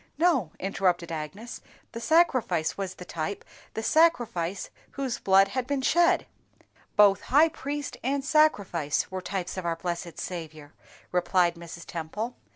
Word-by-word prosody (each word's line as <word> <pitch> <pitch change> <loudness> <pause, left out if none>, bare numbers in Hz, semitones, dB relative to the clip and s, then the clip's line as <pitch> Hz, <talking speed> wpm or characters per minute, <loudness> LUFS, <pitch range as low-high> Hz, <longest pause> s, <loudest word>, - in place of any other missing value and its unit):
"No," 305 - +2
interrupted 180 -3 0
Agnes, 165 +10 -6 0.3
"the 230 - -7
sacrifice 255 - +2
was 195 -2 -4
the 180 - -10
type, 170 +5 -4 0.3
the 220 - -3
sacrifice 230 - +2 0.2
whose 270 -4 -3
blood 195 0 +5
had 255 -1 -3
been 280 -1 -1
shed." 345 +4 +3 0.7
"Both 200 -2 +6
high 300 +5 +6
priest 290 -2 -5
and 275 +2 -1
sacrifice 200 - +2
were 185 0 -4
types 185 0 -4
of 185 - -4
our 165 - 0
blessed 170 0 -5
Saviour," 155 -4 -7 0.4
replied 180 0 +2
Mrs. 170 0 -10
Temple. 210 +9 -5
195 Hz, 140 wpm, -27 LUFS, 170-265 Hz, 0.7 s, Both